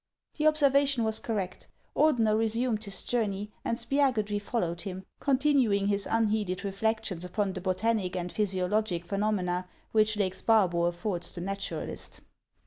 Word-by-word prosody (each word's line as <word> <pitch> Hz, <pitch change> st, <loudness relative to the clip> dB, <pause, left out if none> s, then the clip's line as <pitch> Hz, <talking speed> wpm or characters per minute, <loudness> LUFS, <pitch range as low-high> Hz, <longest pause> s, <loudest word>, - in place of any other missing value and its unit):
The 305 Hz, 0 st, +2 dB
observation 280 Hz, -4 st, +3 dB
was 220 Hz, 0 st, +1 dB
correct. 195 Hz, -5 st, -4 dB, 0.3 s
Ordener 230 Hz, -9 st, +3 dB
resumed 225 Hz, 0 st, 0 dB
his 195 Hz, -2 st, -2 dB
jour 235 Hz, -3 st, 0 dB
ney, 200 Hz, +1 st, -5 dB
and 230 Hz, -, -1 dB
Spiagudry 235 Hz, -8 st, +1 dB
followed 175 Hz, -6 st, -2 dB
him, 190 Hz, -2 st, -6 dB
continuing 265 Hz, -7 st, +2 dB
his 200 Hz, 0 st, +2 dB
unheeded 210 Hz, -4 st, 0 dB
reflections 200 Hz, -2 st, -2 dB
upon 190 Hz, +2 st, -1 dB
the 185 Hz, -, -5 dB
botanic 190 Hz, 0 st, 0 dB
and 180 Hz, -1 st, -3 dB
physiologic 190 Hz, -2 st, 0 dB
phenomena 185 Hz, -2 st, -1 dB, 0.2 s
which 215 Hz, -1 st, +3 dB
Lake 190 Hz, -3 st, 0 dB
Sparbo 185 Hz, -6 st, +3 dB
affords 175 Hz, 0 st, -1 dB
the 175 Hz, -, -5 dB
naturalist. 195 Hz, +2 st, -5 dB
210 Hz, 135 wpm, -29 LUFS, 185-225 Hz, 0.3 s, observation